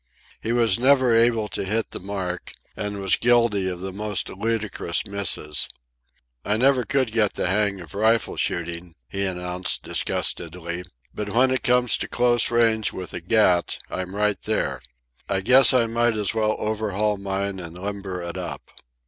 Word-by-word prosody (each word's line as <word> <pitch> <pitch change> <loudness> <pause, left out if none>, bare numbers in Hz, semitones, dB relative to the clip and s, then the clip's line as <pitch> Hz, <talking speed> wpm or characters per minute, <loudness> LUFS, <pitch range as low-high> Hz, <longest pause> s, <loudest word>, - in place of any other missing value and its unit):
He 115 - -2
was 115 -3 +2
never 130 -1 +4
able 115 -1 +3
to - - -3
hit 110 +4 -1
the - - -6
mark, 95 -2 -5 0.2
and 105 -1 -4
was 95 -1 +2
guilty 115 -6 +2
of 90 -1 -6
the 95 0 -5
most 105 -1 -2
ludicrous 105 -4 -1
misses. 100 -7 0 0.7
"I 105 +1 0
never 130 0 +3
could 135 -4 0
get 110 -3 +1
the - - -1
hang 100 +1 +1
of 85 -4 -11
rifle 110 +2 +2
shooting," 85 0 -3
he 100 0 -3
announced 90 -1 -2
disgustedly, 85 +1 -2 0.3
"but 105 -1 -4
when 125 +5 +3
it 130 - 0
comes 125 -2 +3
to - - -4
close 120 0 +2
range 115 -2 +2
with 90 -1 -7
a 85 - -4
gat 90 -2 +2
I'm 95 +1 -4
right 105 0 0
there. - - -2 0.5
I 95 -1 +1
guess 130 +6 +7
I 125 -3 +3
might 115 0 +1
as 105 0 0
well 110 -1 +1
overhaul 105 -1 -1
mine 100 0 -3
and 85 -1 -8
limber 95 -2 -5
it 85 +1 -6
up." 85 -2 -7
105 Hz, 165 wpm, -23 LUFS, 95-115 Hz, 0.7 s, guess